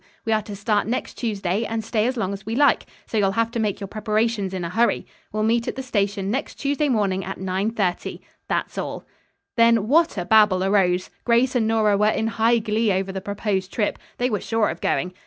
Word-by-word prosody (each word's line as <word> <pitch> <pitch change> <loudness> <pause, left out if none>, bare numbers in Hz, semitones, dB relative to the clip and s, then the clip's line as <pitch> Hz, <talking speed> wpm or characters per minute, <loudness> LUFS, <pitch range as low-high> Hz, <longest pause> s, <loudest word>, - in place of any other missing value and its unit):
We 225 - +1
are 215 - +2
to 205 -1 -8
start 205 0 0
next 245 +3 -2
Tuesday, 205 -3 -1
and 225 0 -3
stay 220 0 0
as 255 0 -2
long 195 -3 -1
as 195 0 -7
we 220 +3 -3
like. 285 +2 +3 0.2
So 220 - -1
you'll 195 -1 +2
have 230 +2 0
to 235 - -3
make 210 -3 -1
your 200 - -5
preparations 215 -1 -1
in 185 -2 -4
a 170 - -3
hurry. 230 +4 +1 0.3
We'll 215 0 -1
meet 230 +1 +1
at - - -2
the 265 - -5
station 200 -4 -1
next 270 +6 -3
Tuesday 285 +1 0
morning 200 -5 +1
at 195 +2 -5
9.30. 190 0 -2 0.3
That's - - -2
all." - - -5 0.5
Then 230 -2 +4
what 320 0 +3
a 175 - -2
babble 210 -3 +5
arose. 185 -2 +2
Grace 240 +2 +3
and 235 -4 +1
Nora 215 -2 +3
were 210 +1 +3
in 220 - 0
high 225 +1 +2
glee 220 -1 +1
over 190 0 -1
the 190 0 -5
proposed 200 -1 -2
trip. 210 -3 -1 0.2
They 250 +1 0
were 210 - -1
sure 225 -2 +1
of - - -6
going. 180 +1 0
215 Hz, 220 wpm, -23 LUFS, 195-230 Hz, 0.5 s, babble